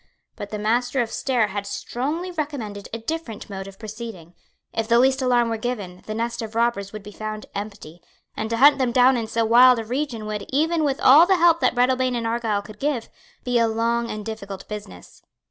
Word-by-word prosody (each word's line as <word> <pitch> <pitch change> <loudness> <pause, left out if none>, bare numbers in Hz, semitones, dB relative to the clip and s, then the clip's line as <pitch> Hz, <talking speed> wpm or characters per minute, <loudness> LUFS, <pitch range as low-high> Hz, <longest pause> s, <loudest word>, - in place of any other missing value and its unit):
But 205 - -7
the 210 - -4
Master 245 +5 0
of 225 - -8
Stair 240 -6 0
had 200 +1 -4
strongly 300 - -3
recommended 275 - -5
a 230 - -3
different 230 -2 -5
mode 195 0 -6
of 195 0 -12
proceeding. 215 -6 -8 0.4
If 225 -1 -1
the 235 0 +4
least 265 +2 +3
alarm 245 -2 +2
were 225 - -1
given, 210 -6 -5
the 215 - -4
nest 235 +1 -2
of 220 0 -7
robbers 230 -4 0
would 215 -1 -8
be 210 - -10
found 215 0 -6
empty; 200 -5 -7 0.3
and 220 - -3
to 230 - -1
hunt 285 +3 +6
them 255 -2 +1
down 255 +2 +5
in 230 -2 -2
so 230 +1 0
wild 245 +2 +7
a 225 - -4
region 245 -2 -3
would, 210 -1 -4
even 315 +4 +1
with 280 -2 0
all 305 +7 +8
the 380 -1 +4
help 340 -1 +5
that 255 -2 +2
Breadalbane 255 0 +2
and 235 -1 -2
Argyle 225 -3 -1
could 215 0 -12
give, 275 -5 -2 0.3
be 245 -1 +1
a 230 - +3
long 230 +1 0
and 210 -1 -5
difficult 200 -3 -7
business. 205 - -9
230 Hz, 215 wpm, -23 LUFS, 215-255 Hz, 0.4 s, all